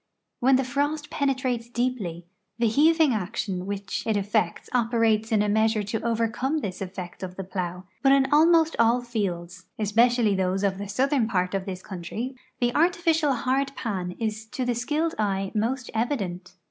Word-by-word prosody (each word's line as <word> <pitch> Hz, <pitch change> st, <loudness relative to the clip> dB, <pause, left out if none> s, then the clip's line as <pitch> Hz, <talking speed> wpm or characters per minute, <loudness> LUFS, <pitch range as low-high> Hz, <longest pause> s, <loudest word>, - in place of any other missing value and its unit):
When 265 Hz, +2 st, +5 dB
the 265 Hz, -, +2 dB
frost 290 Hz, +3 st, -2 dB
penetrates 255 Hz, -4 st, -1 dB
deepl.y, 240 Hz, -9 st, -2 dB, 0.3 s
the 235 Hz, -, +1 dB
heaving 305 Hz, +4 st, +4 dB
action 195 Hz, -2 st, -3 dB
which 200 Hz, 0 st, -3 dB
it 220 Hz, -2 st, +2 dB
effects 200 Hz, -3 st, 0 dB
operates 225 Hz, -2 st, +2 dB
in 210 Hz, -2 st, +3 dB
a -, -, 0 dB
measure 220 Hz, +1 st, +2 dB
to 210 Hz, +2 st, -3 dB
overcome 230 Hz, +5 st, 0 dB
this 200 Hz, -11 st, -4 dB
effect 185 Hz, -2 st, -6 dB
of 185 Hz, -1 st, -6 dB
the 195 Hz, -, -5 dB
jdIow, 180 Hz, -1 st, -4 dB, 0.2 s
but 270 Hz, -, +5 dB
in 275 Hz, -1 st, +5 dB
almost 325 Hz, +1 st, +5 dB
all 235 Hz, +2 st, +4 dB
fields, 180 Hz, -6 st, -4 dB
especially 225 Hz, +1 st, +3 dB
those 190 Hz, +1 st, 0 dB
of 195 Hz, -1 st, 0 dB
the 205 Hz, -, -5 dB
southern 260 Hz, +2 st, +1 dB
part 185 Hz, -4 st, 0 dB
of 195 Hz, -1 st, -1 dB
this 185 Hz, -1 st, -5 dB
country, 210 Hz, +8 st, -5 dB, 0.2 s
the 240 Hz, -1 st, +1 dB
artificial 330 Hz, -2 st, +2 dB
hard 270 Hz, +3 st, 0 dB
pan 185 Hz, -6 st, -3 dB
is 220 Hz, -1 st, -3 dB
to 255 Hz, +3 st, -3 dB
the 245 Hz, -, +1 dB
skilled 300 Hz, +8 st, -1 dB
eye 195 Hz, -2 st, 0 dB
most 235 Hz, +3 st, -1 dB
evident. 195 Hz, -7 st, -2 dB
225 Hz, 170 wpm, -26 LUFS, 195-260 Hz, 0.3 s, When